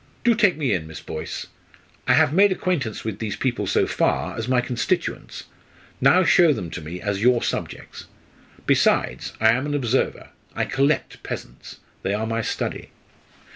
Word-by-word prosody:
"Do 235 Hz, -, +5 dB
take 210 Hz, -7 st, +3 dB
me 145 Hz, -4 st, 0 dB
in, 80 Hz, -4 st, -2 dB
Miss 80 Hz, -, -8 dB
Boyce. 80 Hz, -, -6 dB, 0.6 s
I -, -, +5 dB
have 140 Hz, -, +4 dB
made 200 Hz, +3 st, +5 dB
acquaintance 175 Hz, -, -2 dB
with 110 Hz, -2 st, -4 dB
these 110 Hz, -3 st, -3 dB
people 130 Hz, -2 st, -1 dB
so -, -, +2 dB
far, -, -, 0 dB
as 110 Hz, -, -4 dB
my 130 Hz, -1 st, +3 dB
constituents 125 Hz, -1 st, -2 dB, 0.6 s
now 185 Hz, +3 st, +5 dB
show 170 Hz, -2 st, +5 dB
them 85 Hz, -10 st, -5 dB
to 90 Hz, -, -6 dB
me 80 Hz, +4 st, -7 dB
as 100 Hz, 0 st, -2 dB
your 125 Hz, +1 st, +4 dB
subjects. -, -, -5 dB, 0.6 s
Besides, -, -, +1 dB
I 110 Hz, -, +5 dB
am 130 Hz, +5 st, 0 dB
an 145 Hz, -, -1 dB
observer. 130 Hz, -2 st, -1 dB, 0.3 s
I -, -, 0 dB
'collect' 140 Hz, +3 st, 0 dB
peasants. -, -, -8 dB, 0.2 s
They 100 Hz, -, -1 dB
are 110 Hz, +1 st, -2 dB
my 115 Hz, +1 st, -1 dB
study." -, -, -4 dB
125 Hz, 170 wpm, -23 LUFS, 105-150 Hz, 0.6 s, Do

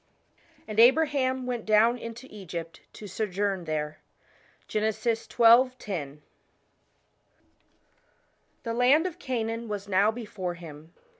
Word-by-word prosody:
"And 215 Hz, 0 st, -3 dB
Abraham 260 Hz, 0 st, +4 dB
went 245 Hz, -3 st, -3 dB
down 225 Hz, +3 st, +3 dB
into 230 Hz, +2 st, -8 dB
Egypt 170 Hz, -5 st, -8 dB
to 215 Hz, -, -10 dB
sojourn 195 Hz, -2 st, -2 dB
there." 150 Hz, -1 st, -3 dB, 0.7 s
GEN. 215 Hz, +1 st, 0 dB
xii. 220 Hz, +2 st, -1 dB
*0. 225 Hz, -, +2 dB, 2.5 s
THE 230 Hz, -, -3 dB
land 255 Hz, +7 st, +4 dB
of 360 Hz, -1 st, -5 dB
Canaan 230 Hz, -4 st, -3 dB
was 205 Hz, -1 st, -5 dB
now 200 Hz, +2 st, +3 dB
before 210 Hz, -6 st, -5 dB
him. 160 Hz, -1 st, -12 dB
220 Hz, 105 wpm, -27 LUFS, 190-245 Hz, 2.5 s, Abraham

